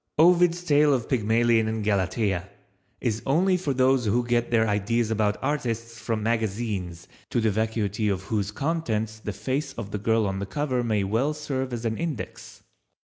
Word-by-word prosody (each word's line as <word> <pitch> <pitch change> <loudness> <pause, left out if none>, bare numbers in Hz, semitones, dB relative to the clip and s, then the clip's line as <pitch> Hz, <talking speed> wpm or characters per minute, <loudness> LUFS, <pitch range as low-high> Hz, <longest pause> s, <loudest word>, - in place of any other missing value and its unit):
Ovid's 175 +1 +5
tale 150 -3 +4
of 120 -3 -3
Pygmalion 115 -1 +2
and 110 -1 -2
Galatea 100 -2 0 0.5
is 110 -3 -1
only 180 +7 +3
for 175 -5 -1
those 130 -1 +3
who 120 +4 +1
get 120 0 +1
their 115 -1 +3
ideas 110 +3 0
about 105 -1 +1
artists 115 -5 -2
from 110 -2 -2
magazines 105 -6 -2 0.2
to 120 - 0
the 110 -1 +2
vacuity 110 0 -1
of 95 -2 -1
whose 100 -1 -1
contents 110 -5 -2
the 105 - -4
face 130 +8 -3
of 105 -5 -7
the 105 - -3
girl 110 +1 +2
on 95 -1 -2
the 100 - -4
cover 130 0 -1
may 110 -4 +1
well 120 +10 0
serve 135 -3 -3
as 120 -1 -4
an 110 -1 -1
index. 165 -7 -6
115 Hz, 175 wpm, -26 LUFS, 105-130 Hz, 0.5 s, Ovid's